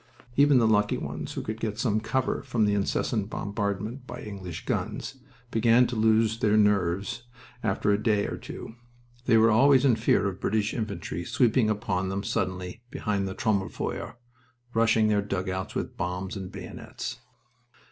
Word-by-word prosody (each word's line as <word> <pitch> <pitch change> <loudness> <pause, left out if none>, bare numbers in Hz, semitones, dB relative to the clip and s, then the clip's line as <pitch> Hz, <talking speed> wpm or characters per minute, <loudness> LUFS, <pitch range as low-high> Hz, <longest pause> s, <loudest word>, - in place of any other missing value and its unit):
Even 140 -1 +6
the 120 - +4
lucky 105 -1 +3
ones - - -5
who - - -4
could 110 +1 -4
get 110 -2 -3
some 110 -3 +1
cover 125 +4 -1
from 120 -5 +1
the 105 - +2
incessant 100 +1 0
bombardment 105 +5 -3
by - - -7
English 95 -5 -7
guns 135 - -3 0.3
began 115 +2 +5
to 120 - -3
lose 110 0 +3
their 105 -1 +3
nerves 105 +3 +1 0.4
after 105 -1 +1
a 100 +1 +2
day 105 -2 +2
or - - -3
two. - - -8 0.5
They 115 - +6
were 115 +1 +5
always 135 +4 +5
in 125 -4 +5
fear 100 -2 +2
of 95 -1 -4
British 105 0 0
infantry 90 -7 -4
sweeping 115 +3 +2
upon 95 -3 -1
them 100 +1 -2
suddenly 95 -1 -2
behind 100 -4 -1
the 95 - -5
Trommelfeuer, 100 -3 -2 0.6
rushing 115 -1 +4
their 105 -1 +3
dugouts 95 -1 -3
with - - -3
bombs 90 +2 -3
and 95 -2 -6
bayonets. - - -7
105 Hz, 160 wpm, -27 LUFS, 100-115 Hz, 0.6 s, Even